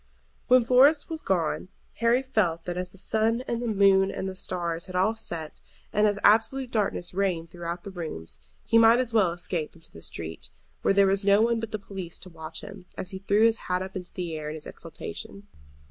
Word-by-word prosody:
When 255 -2 +5
Florence 275 +7 +5
was 320 -1 -4
gone 180 -2 0 0.3
Harry 235 +3 +3
felt 185 -11 0
that 175 - -3
as 180 0 -4
the 195 - -14
sun 220 +4 +1
and 235 -2 -3
the 240 - -2
moon 195 -2 +4
and 190 - -4
the 190 - -5
stars 170 -2 -3
had 185 - -8
all 190 +5 +3
set, 165 -8 -6 0.3
and 210 +1 +4
as 205 -1 0
absolute 235 +4 +3
darkness 200 -5 -1
reigned 180 -4 -1
through 175 -1 -7 0.2
the 200 - -7
rooms, 155 - -6 0.3
he 230 0 +4
might 230 +1 +7
as 250 -2 -1
well 200 -6 +4
escape 170 -2 -3
into 165 - -16
the 80 - -12
street, 80 -6 -7 0.3
where 195 - +2
there 200 0 +6
was 195 +1 +1
no 200 +1 +5
one 235 0 +2
but 225 -1 -5
the 215 - -2
police 195 -4 -6
to 185 - -11
watch 160 -1 -7
him, 200 -3 -11
as 185 - -3
he 190 - -6
threw 200 +2 +2
his 230 0 +3
hat 180 0 +1
up 190 0 -9
into 180 -1 -6
the 175 -3 -4
air 150 -1 -4
in 155 - -5
his 155 - -9
exultation. 100 +1 -9
195 Hz, 220 wpm, -27 LUFS, 175-225 Hz, 0.3 s, might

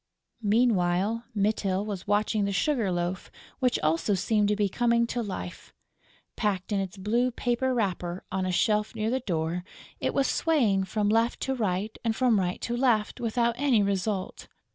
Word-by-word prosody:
Meanwhile, 210 -1 +2
Mytyl 200 -1 0
was 200 -3 -5
watching 205 0 +1
the 200 - -1
sugar 225 -1 +1
loaf, 175 +1 -2 0.3
which 250 -2 +2
also 165 +6 +2
seemed 210 +2 +1
to 210 - +2
be 205 -1 +1
coming 235 +3 +2
to 240 +1 -2
life. 190 -4 -7 0.6
Packed 200 -2 -1
in 200 - +1
its 195 0 -4
blue 230 +6 +1
paper 245 +1 -1
wrapper, 185 -6 -2
on 190 0 -1
a 185 - -1
shelf 210 +4 +1
near 220 +1 -1
the 260 - +1
door, 170 -5 -2 0.4
it - - -1
was 275 - +3
swaying 225 -13 +2
from 205 +2 -1
left 225 +3 +2
to 265 - -1
right 210 -3 -1
and 225 -2 0
from 245 -4 +3
right 180 -1 -1
to 240 - -2
left 240 -4 +1
without 235 0 +1
any 260 -7 +3
result. 195 0 -2
210 Hz, 170 wpm, -27 LUFS, 190-235 Hz, 0.6 s, was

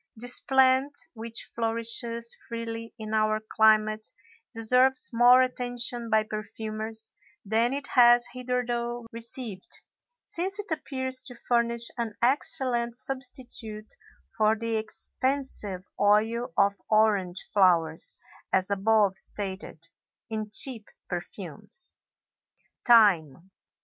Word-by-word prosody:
This 245 +2 0
plant 265 +1 +2 0.2
which 230 0 -7
flourishes 230 0 -3
freely 230 -1 -6
in 215 -1 -7
our 215 0 +1
climate 215 0 +2 0.4
deserves 250 +3 +3
more 245 +2 +6
attention 245 -2 -3
by 220 0 +2
perfumers 220 +1 -6 0.3
than 225 +4 +1
it 280 +1 -4
has 240 -1 +5
hitherto 240 -1 -3
received, 230 -3 -1 0.5
since 380 +4 +3
it 415 -4 -1
appears 260 -4 0
to 245 - -9
furnish 235 -1 0
an 225 -3 -3
excellent 240 -2 +1
substitute 245 -5 0 0.4
for 215 0 +2
the 230 0 -2
expensive 220 -4 -1
oil 220 +4 +1
of 200 0 +3 0.2
orange 205 -4 +1
flowers, 170 -5 +2 0.3
as 190 +1 +1
above 200 -1 +2
stated, 190 -6 -2 0.4
in 215 -1 -4
cheap 225 -1 +4 0.2
perfumes. - - -3 0.9
THYME. 190 - +3
230 Hz, 100 wpm, -26 LUFS, 215-245 Hz, 0.9 s, more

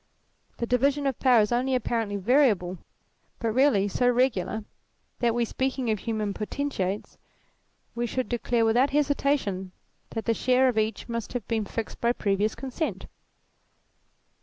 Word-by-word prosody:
The 235 - -1
division 275 +4 +1
of 270 -3 -1
power 250 -4 +5
is 210 - 0
only 255 +2 +1
apparently 225 -4 -1
variable, 200 - +2 0.6
but 230 -1 -1
really 245 -5 +3
so 245 +5 +2
regular 235 -4 +1 0.6
that, 240 -1 +2
were - - -1
we 240 - +2
speaking 260 0 -1
of 215 - -1
human 215 -1 -2
potentates, 210 -4 -3 0.7
we 240 0 -2
should 255 +2 -2
declare 240 -1 0
without 245 +5 +3
hesitation 275 -10 0 0.4
that 225 -2 -5
the 230 - +2
share 255 +3 +3
of 225 -3 +1
each 215 -1 -2
must 230 -1 -4
have 245 -5 -4
been 220 -2 -1
fixed 225 +2 -5
by 235 0 +3
previous 205 -1 0
consent. 270 +4 -4
235 Hz, 150 wpm, -26 LUFS, 215-260 Hz, 0.7 s, power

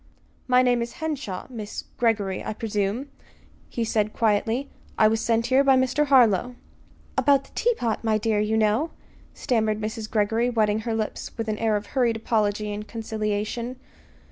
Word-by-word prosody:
"My 250 0 +5
name 245 -1 +2
is 235 - -4
Henshaw, 285 - -4
Miss 215 -4 -6 0.2
Greggory, 210 -6 +1
I - - -3
presume," 215 +4 -2 0.6
he 235 - -2
said 215 -1 0
quietly. 225 +4 0 0.3
"I 215 - +6
was 220 +1 +1
sent 230 0 +1
here 260 +2 +4
by 270 -1 +5
Mr. 260 +3 +1
Harlow." 245 -3 +4 0.6
"About 280 -1 +4
the - - -20
teapot, 245 - 0
my 220 -1 +2
dear, 215 -1 0
you 215 +1 +1
know," 220 +9 +2 0.5
stammered 220 -3 0
Mrs. 215 0 -4
Greggory, 225 +3 +1
wetting 215 -3 +1
her 225 - 0
lips 215 -1 -4
with 225 -1 -3
an 215 - -2
air 225 -2 +2
of 205 0 -2
hurried 240 -3 +1
apology 210 -2 0
and 210 +1 -6
conciliation. 220 +2 -3
225 Hz, 165 wpm, -25 LUFS, 215-245 Hz, 0.6 s, I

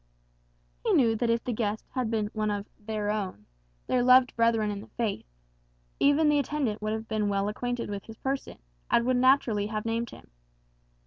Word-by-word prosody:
He - - +2
knew 230 -4 +4
that 235 +1 0
if 230 0 +1
the 245 - -2
guest 215 -1 -2
had 250 -3 -1
been 215 -2 -1
one 215 -1 -1
of 205 -1 -2
"their 210 -1 -2
own," 190 - -4 0.4
their 250 - +1
loved 255 +1 +5
brethren 230 -2 +2
in 200 -1 -5
the - - -12
faith, 220 - -3 0.7
even 290 +2 +4
the 295 -1 +4
attendant 275 -6 -1
would 215 0 -1
have 220 0 -4
been 215 -2 0
well 200 0 0
acquainted 245 +3 -3
with 200 -1 -5
his 225 -1 -11
person, 270 0 -3 0.3
and 235 - +3
would 255 0 +2
naturally 245 -5 +3
have 215 0 -4
named 230 0 -1
him. - - -14
225 Hz, 190 wpm, -28 LUFS, 210-245 Hz, 0.7 s, loved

